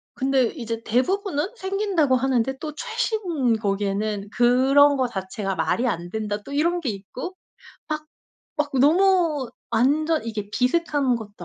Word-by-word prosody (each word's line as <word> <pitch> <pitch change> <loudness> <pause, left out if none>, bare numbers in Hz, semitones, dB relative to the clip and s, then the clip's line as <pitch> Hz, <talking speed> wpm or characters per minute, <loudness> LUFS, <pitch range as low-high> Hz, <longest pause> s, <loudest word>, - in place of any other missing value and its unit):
근데 265 -1 +2
이제 230 -4 -4
대부분은 310 - 0
생긴다고 380 -8 +1
하는데 265 0 +1
또 305 -1 -5
최신 355 - -1
거기에는 205 0 -1
"그런 265 +4 +5
거 260 -2 +1
자체가 195 -2 -4
말이 185 +9 0
안 175 -6 -2
된다." 210 0 -3
또 280 - -9
이런 340 +5 +1
게 290 - -2
있고 220 - -6 0.5
막, 305 0 -3 0.5
막 300 -1 0
너무 325 -3 +3 0.2
완전 300 +7 +2
이게 215 -3 -4
비슷한 275 +1 +1
것도 205 -5 -10
260 Hz, 275 characters per minute, -23 LUFS, 220-310 Hz, 0.5 s, 그런